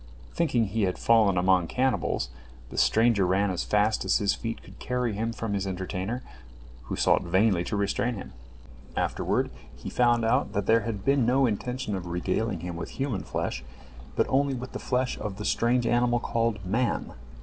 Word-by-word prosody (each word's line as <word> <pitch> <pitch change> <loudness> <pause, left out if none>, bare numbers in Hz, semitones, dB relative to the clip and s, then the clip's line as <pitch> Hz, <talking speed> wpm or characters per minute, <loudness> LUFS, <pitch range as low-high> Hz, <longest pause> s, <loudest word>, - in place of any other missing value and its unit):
Thinking 125 -9 +2
he 110 +3 -2
had 90 - -1
fallen 110 -5 +4
among 90 -1 +3
cannibals, 130 - 0 0.4
the - - -8
stranger 110 -3 +4
ran 95 +2 +2
as 90 - -2
fast 105 +1 +2
as - - +3
his 100 -1 +1
feet 115 -1 -5
could - - -15
carry 125 -3 -1
him 115 +3 -2
from 115 -2 -4
his 100 -1 -1
entertainer, 95 +5 -3 0.6
who - - -3
sought - - +3
vainly 95 +1 +2
to 105 - -2
restrain 100 +4 0
him. 100 - -8 0.6
Afterward, - - 0 0.2
he - - -7
found 120 -2 +3
out 115 -1 +1
that 100 -2 -1
there 115 +2 +4
had 105 -2 -4
been 140 -1 +3
no 135 +2 +4
intention 125 0 -2
of 90 -2 -5
regaling 90 +2 -1
him 85 0 -5
with 85 - -7
human 135 -7 -1
flesh, 65 - -3 0.5
but - - +3
only 140 0 +2
with 125 +1 -6
the - - -5
flesh 125 0 -1
of 100 -2 -5
the 105 - -5
strange 120 +4 +2
animal 120 +1 +2
called 115 -4 -1
"man." 115 +7 -1
110 Hz, 180 wpm, -27 LUFS, 95-120 Hz, 0.6 s, fallen